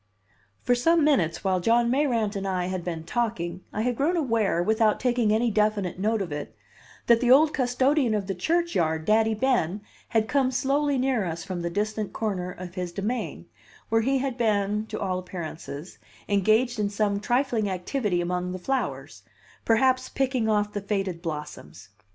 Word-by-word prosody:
For 245 - +3
some 325 +7 +3
minutes, 175 - +2
while 190 -2 +1
John 235 +5 +3
Mayrant 240 -7 +1
and 195 0 -3
I 185 -2 -1
had 185 -1 -3
been 165 -2 -4
talking, 180 -4 -2
I 215 - -2
had 245 0 0
grown 320 +8 +1
aware, 225 - +1
without 220 +2 +2
taking 240 -4 +1
any 225 +2 +2
definite 210 -4 0
note 215 +1 +1
of 175 - -8
it, 145 0 -6 0.5
that 235 0 +4
the 245 - +2
old 295 +4 +6
custodian 255 -1 +2
of 205 -2 -1
the 195 - -2
churchyard, 180 - 0
Daddy 220 +1 +3
Ben, 215 -6 0 0.3
had 220 -1 +1
come 270 -1 +2
slowly 275 +2 +1
near 255 -4 +1
us 165 -2 -4
from 180 -2 -5
the 170 - -2
distant 210 +3 -2
corner 190 -5 -2
of 180 -1 -9
his 180 -2 -4
demesne, 210 +7 -3 0.4
where 225 0 +3
he 270 +4 +1
had 260 -1 -3
been 210 -1 +1
(to - - -5
all 185 -2 -1
appearances) 170 -3 -7 0.3
engaged 220 +4 +2
in 205 -1 +1
some 200 -1 0
trifling 240 -2 0
activity 185 0 -1
among 180 +1 -2
the - - -4
flowers 265 +9 -3 0.4
perhaps 255 +3 +3
picking 255 -4 0
off 210 -1 +1
the 205 - -3
faded 195 -4 -2
blossoms. 150 - -7
215 Hz, 175 wpm, -26 LUFS, 185-245 Hz, 0.5 s, old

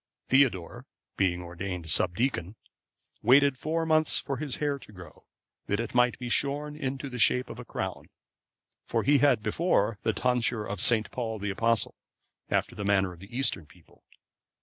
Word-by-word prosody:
(525) 135 -1 +6
Theodore, 85 -3 -9 0.3
being 90 -2 +1
ordained 90 0 -5
subdeacon, 90 - 0 0.7
waited 140 +3 +5
four 160 +5 -2
months 155 -1 +4
for 135 -2 -3
his 145 -4 -3
hair 145 -2 -1
to 105 - -15
grow, 90 -3 -14 0.4
that 100 - 0
it 115 -1 -4
might 125 -1 +3
be 125 - -6
shorn 145 +4 0
into 135 -1 -4
the 125 -2 -7
shape 125 +3 +2
of - - -9
a - - -8
crown; - - -5 0.8
for - - 0
he 145 0 +4
had 130 -7 +3
before 115 - +1
the 110 - +1
tonsure 120 -2 0
of 100 -2 -4
St. 110 -3 +3
Paul,(526) 110 -4 -4
the 105 - -1
Apostle, 115 +3 +1 0.5
after - - 0
the 105 - -6
manner 100 -2 +2
of 85 - -15
the 100 +6 -9
eastern 135 - +1
people. 85 +1 -23
120 Hz, 170 wpm, -28 LUFS, 100-140 Hz, 0.8 s, 525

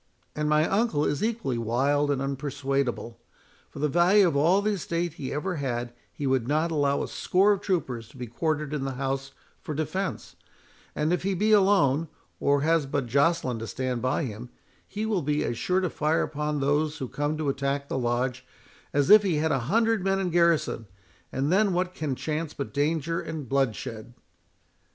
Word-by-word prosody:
And 150 0 -1
my 150 +1 +3
uncle 195 -8 +1
is 145 +4 -1
equally 215 - -1
wild 140 +6 +1
and 135 -1 0
unpersuadable. 135 -3 -2 0.5
For - - -13
the 150 +2 +1
value 180 +6 +5
of 160 - -1
all 175 +8 +3
the 215 - +1
estate 170 -3 -2
he 135 -5 -6
ever 175 +4 -2
had, 120 -3 -3 0.2
he 145 - -5
would 130 -3 +1
not 155 +4 +1
allow 140 -2 +1
a - - -4
score 195 +3 +2
of 200 -1 0
troopers 130 - -2
to 135 - -16
be 125 - -5
quartered 150 +4 -2
in 145 -3 -2
the 135 -1 -3
house 135 +1 -3 0.3
for 155 - -5
defence; 160 +6 -3 0.6
and 155 +3 +1
if 180 - 0
he 195 +1 -1
be 215 +4 +1
alone, 190 -8 +4 0.3
or 140 0 +2
has 160 -1 +2
but 140 -1 -1
Joceline 140 -1 +1
to 115 - -5
stand 125 -1 -3
by 130 +6 0
him, 120 -1 -6 0.4
he 210 +2 -4
will 210 -5 0
be 150 +1 0
as 120 - -2
sure 185 +1 +1
to 180 - 0
fire 155 +2 +1
upon 150 0 -2
those 150 +2 +1
who 130 - -4
come 145 +4 -2
to 155 -2 -1
attack 140 +1 -1
the 130 - -2
Lodge, 125 +1 -1 0.5
as 145 +5 +2
if 215 0 +10
he 190 -5 0
had 155 +1 +1
a 135 - +2
hundred 225 -1 +2
men 195 0 +1
in 185 -2 -1
garrison; 170 -9 +2 0.4
and 135 +4 -1
then 200 0 +3
what 180 +1 -1
can 150 -6 -3
chance 155 +2 -3
but 140 - -5
danger 160 +3 0
and 155 -4 -6
bloodshed?" 120 -3 -2
150 Hz, 190 wpm, -26 LUFS, 135-170 Hz, 0.6 s, if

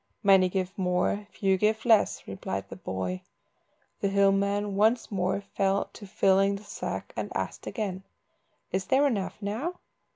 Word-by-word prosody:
"Many 190 -2 +6
give 185 0 -2
more, 180 +3 0
few 195 -1 +1
give 215 +3 +1
less," 225 -3 +3
replied 95 0 -4
the - - -7
boy. 95 -1 -4 0.8
The - - +1
hill 195 0 +4
man 200 +1 0
once 220 +4 +2
more 190 0 0
fell 195 0 0
to 205 - -10
filling 195 +1 +3
the 200 - -9
sack, - - -5
and - - -2
again - - -9
asked 195 -4 -4 0.6
"Is 190 0 -1
there 270 +2 +4
enough 210 -9 -1
now?" 240 - -2
195 Hz, 155 wpm, -28 LUFS, 190-210 Hz, 0.8 s, Many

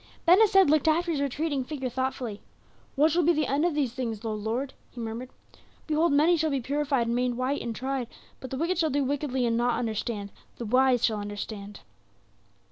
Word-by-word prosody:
Ben 355 +3 +7
Hesed 390 -4 +6
looked 305 +1 +3
after 335 +2 +2
his 290 -4 -1
retreating 285 0 -1
figure 265 -1 -4
thoughtfully. 255 -4 -3 0.5
"What 300 +3 +4
shall 345 +3 +3
be 340 +1 +4
the 305 -1 +1
end 285 +4 +1
of 345 -4 0
these 270 -6 0
things, 235 -4 -4
O 220 - -1
Lord?" 225 +6 -3 0.2
he 245 - -11
murmured. 230 +2 -5 0.6
"Behold 315 +1 +2
many 305 +5 +4
shall 315 0 +1
be 275 -2 0
purified, 275 -1 0
and 235 +1 -1
made 250 0 0
white, 255 +3 -1
and 230 -1 -4
tried; 265 0 -2 0.3
but 260 - -8
the 265 - -4
wicked 340 +4 0
shall 320 -2 +2
do 285 0 +1
wickedly 270 -2 -1
and 235 - +1
shall 240 - +2
not 240 - +1
understand; 220 -3 -3 0.3
the 235 - -5
wise 255 +1 +3
shall 215 -2 0
understand." 205 0 -6
265 Hz, 210 wpm, -27 LUFS, 235-300 Hz, 0.6 s, Ben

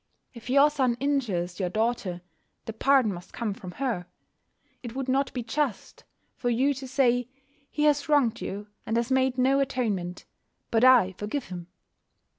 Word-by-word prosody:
If 235 0 -11
your 280 +3 +5
son 260 -5 +1
injure 260 -11 0
your 185 -3 -1
daughter, 215 -4 -1 0.4
the 225 - -5
pardon 255 -2 +3
must 175 0 -11
come 225 -4 -2
from 185 -2 -9
her. 230 -7 -2 0.7
It 240 -1 -8
would 270 -1 -3
not 270 +1 +1
be 245 - -4
just 250 -1 -3 0.3
for 245 - -2
you 260 +5 +2
to 270 0 -8
say: 250 -2 +2 0.4
"He 300 - -2
has 295 0 +2
wronged 260 -6 +3
you, 205 +2 -5 0.2
and 225 - -1
has 235 +2 -1
made 260 -1 +2
no 265 +2 +3
atonement, 215 -10 -2 0.5
but 225 +1 +2
I 250 -7 +6
forgive 215 +5 -4
him." 175 -2 -7
245 Hz, 165 wpm, -27 LUFS, 210-270 Hz, 0.7 s, I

